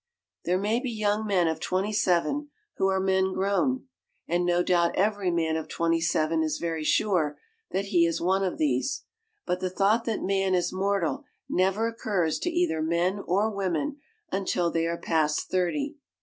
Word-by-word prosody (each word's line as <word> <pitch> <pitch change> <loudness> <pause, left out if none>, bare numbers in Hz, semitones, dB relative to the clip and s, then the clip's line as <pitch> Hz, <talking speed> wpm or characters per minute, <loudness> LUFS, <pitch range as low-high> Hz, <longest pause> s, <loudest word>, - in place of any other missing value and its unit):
There 180 +1 +2
may 210 +5 +1
be 255 0 -3
young 215 -1 0
men 185 -4 +2
of 160 - -1
twenty 195 +3 -1
seven 215 - +1 0.3
who 190 - +2
are 190 0 +1
men 190 0 +1
grown, 255 +9 0 0.4
and 175 +1 +1
no 175 0 +2
doubt 170 -2 +2
every 205 -1 +1
man 165 -2 0
of 160 - -3
twenty 165 0 0
seven 160 0 +1
is 155 -1 0
very 165 -2 -3
sure 155 -3 +1 0.3
that 195 +1 -1
he 170 -1 +5
is 165 - -1
one 190 +3 +1
of 185 - -1
these; 145 - 0 0.4
but 180 - -1
the 185 0 -1
thought 205 +5 +2
that 225 -2 -2
man 195 -1 +1
is 175 -1 0
mortal 200 - 0 0.2
never 195 +5 +1
occurs 200 -8 -1
to 350 - -1
either 345 - 0
men 170 +5 +1
or 205 +5 +2
women 200 - -1 0.3
until 180 -3 0
they 165 0 0
are 170 0 -2
past 155 -3 0
thirty. 280 - 0
185 Hz, 180 wpm, -27 LUFS, 170-205 Hz, 0.4 s, he